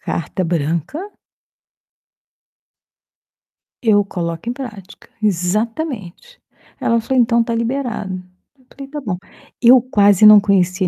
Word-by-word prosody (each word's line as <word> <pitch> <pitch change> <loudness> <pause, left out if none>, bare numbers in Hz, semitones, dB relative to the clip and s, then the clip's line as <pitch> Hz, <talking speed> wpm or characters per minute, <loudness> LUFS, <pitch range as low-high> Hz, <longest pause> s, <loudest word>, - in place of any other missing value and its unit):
carta 175 +3 -3
branca" 165 - -2 2.9
"eu 205 -3 +3
coloco 170 0 -5
em - - -2
prática", 215 -7 -10
exatamente. 215 - -3 0.4
Ela 230 0 +1
falou: 255 +2 +1
"Então, 235 0 +2
está 230 0 -2
liberado". 235 -5 -3 0.5
Eu 255 - -27
falei: 275 0 -10
"Está 295 +1 -7
bom". 195 -9 -3 0.4
Eu 245 +1 +7
quase 205 -5 +3
não 210 0 +9
conhecia 190 -2 +1
215 Hz, 110 wpm, -18 LUFS, 185-245 Hz, 2.9 s, não